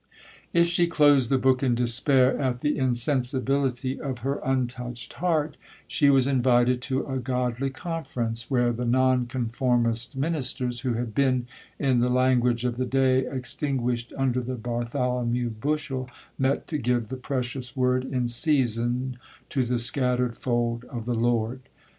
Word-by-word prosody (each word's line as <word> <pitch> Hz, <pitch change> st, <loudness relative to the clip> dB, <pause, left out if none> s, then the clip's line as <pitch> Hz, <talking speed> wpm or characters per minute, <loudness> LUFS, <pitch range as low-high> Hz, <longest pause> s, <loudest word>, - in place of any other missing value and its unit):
If 170 Hz, 0 st, +4 dB
she 175 Hz, 0 st, +2 dB
closed 145 Hz, -6 st, +4 dB
the 135 Hz, -, +3 dB
book 130 Hz, 0 st, +2 dB
in 125 Hz, -3 st, +2 dB
despair 125 Hz, +2 st, +4 dB
at 125 Hz, -2 st, -1 dB
the 150 Hz, 0 st, +1 dB
insensibility 130 Hz, 0 st, 0 dB
of 130 Hz, -4 st, -4 dB
her 140 Hz, +1 st, -1 dB
untouched 125 Hz, -2 st, -3 dB
heart, 155 Hz, -4 st, -1 dB, 0.3 s
she 145 Hz, -, +3 dB
was 135 Hz, -2 st, +4 dB
invited 125 Hz, -2 st, +2 dB
to 130 Hz, +1 st, -1 dB
a 130 Hz, -2 st, -3 dB
godly 125 Hz, +1 st, -1 dB
conference, 130 Hz, -7 st, -4 dB
where 120 Hz, -3 st, +2 dB
the 120 Hz, +2 st, -4 dB
non 130 Hz, 0 st, +2 dB
conformist 120 Hz, 0 st, 0 dB
ministers, 130 Hz, -5 st, -1 dB
who 125 Hz, 0 st, -1 dB
had 115 Hz, -1 st, -4 dB
been, 130 Hz, -2 st, +1 dB, 0.3 s
in 130 Hz, -4 st, +2 dB
the 125 Hz, +1 st, +2 dB
language 125 Hz, -1 st, +2 dB
of 120 Hz, -1 st, -1 dB
the 130 Hz, -, -1 dB
day, 130 Hz, 0 st, +2 dB
extinguished 125 Hz, -2 st, -2 dB
under 130 Hz, -2 st, 0 dB
the 130 Hz, +1 st, -4 dB
Bartholomew 120 Hz, 0 st, -2 dB
bushel,1 135 Hz, +2 st, -3 dB, 0.3 s
met 135 Hz, +1 st, 0 dB
to 155 Hz, -3 st, -2 dB
give 120 Hz, -3 st, 0 dB
the 130 Hz, -, -4 dB
precious 125 Hz, -1 st, -4 dB
word 130 Hz, -1 st, +1 dB
in 130 Hz, -2 st, -2 dB
season 125 Hz, -1 st, +1 dB, 0.3 s
to 135 Hz, -, 0 dB
the 125 Hz, 0 st, -1 dB
scattered 125 Hz, 0 st, +2 dB
fold 120 Hz, -1 st, -1 dB
of 115 Hz, -3 st, -7 dB
the 120 Hz, -, -1 dB
Lord. 120 Hz, +1 st, 0 dB
125 Hz, 150 wpm, -25 LUFS, 120-135 Hz, 0.3 s, If